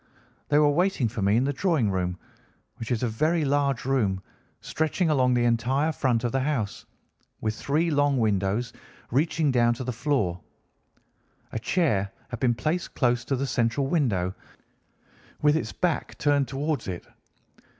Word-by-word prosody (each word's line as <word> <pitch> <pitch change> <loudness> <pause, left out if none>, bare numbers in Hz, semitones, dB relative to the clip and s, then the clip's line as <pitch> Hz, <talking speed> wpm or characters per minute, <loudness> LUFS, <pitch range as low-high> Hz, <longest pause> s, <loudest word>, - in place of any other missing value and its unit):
They 145 - +4
were 150 -1 +5
waiting 175 -5 +1
for 110 0 -5
me 100 +3 +3
in 125 - +3
the 140 +1 0
drawing 145 - +1
room, 90 -1 -1 0.6
which 115 - -6
is 120 -1 0
a - - +2
very 155 +8 +1
large 140 -3 +1
room, 105 -8 0 0.4
stretching 160 +2 0
along 130 -3 +3
the 120 - +2
entire 125 +6 +1
front 125 -5 0
of 120 - 0
the 135 - +1
house, 130 -7 -2 0.5
with 110 -1 -1
three 155 +8 0
long 145 -1 +2
windows 105 +1 0 0.4
reaching 150 +3 +2
down 120 -1 +3
to 130 - -5
the 125 0 -3
floor. 110 - -1 1.1
A - - -3
chair 110 - +1 0.2
had 120 -3 -5
been 120 -2 +2
placed 165 +8 -2
close 125 -2 +2
to 135 - 0
the 135 +2 -1
central 120 +1 0
window, 110 - 0 1.1
with 150 0 +5
its 160 - -2
back 175 -3 -2
turned 145 -2 +2
towards 140 -2 -2
it. 90 -2 -5
130 Hz, 160 wpm, -26 LUFS, 115-145 Hz, 1.1 s, were